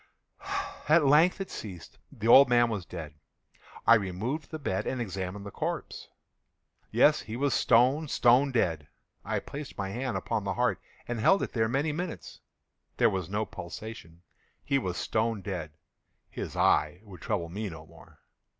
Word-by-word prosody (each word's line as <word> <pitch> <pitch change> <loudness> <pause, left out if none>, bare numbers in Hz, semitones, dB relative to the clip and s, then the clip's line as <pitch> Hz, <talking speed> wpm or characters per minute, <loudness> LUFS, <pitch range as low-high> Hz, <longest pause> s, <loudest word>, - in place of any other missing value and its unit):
At 155 -1 +5
length 155 +8 +5
it 195 - -5
ceased. 95 -6 -9
The 110 0 -5
old 135 +3 +8
man 120 -1 +4
was 100 -5 -4
dead. 80 -4 -7 0.7
I - - +8
removed 110 - -1
the 160 - -5
bed 115 -11 -2
and 130 - -2
examined 100 -2 -4
the 100 - -7
corpse. - - -4 0.8
Yes, - - +4
he 110 - -7
was 140 +3 0
stone, 130 +7 +3
stone 130 +1 +4
dead. 80 - 0 0.4
I - - -2
placed 145 0 -7
my 95 -1 -3
hand 125 +4 -3
upon 115 -3 -2
the 100 -1 -2
heart 125 0 0 0.3
and 120 -1 -3
held 190 - +4
it - - -5
there 110 -2 +1
many 140 +5 0
minutes. 150 - -6 0.6
There - - +4
was 95 -3 -3
no 105 +2 -1
pulsation. 85 -2 -9 0.4
He 140 - +2
was 90 -7 -3
stone 110 -2 -1
dead. 85 -6 -5 0.6
His - - -6
eye 75 +5 +2
would 95 -6 -13
trouble 85 -1 -2
me 105 +4 -4
no 80 -2 -10
more. - - -18
110 Hz, 165 wpm, -29 LUFS, 95-135 Hz, 0.8 s, old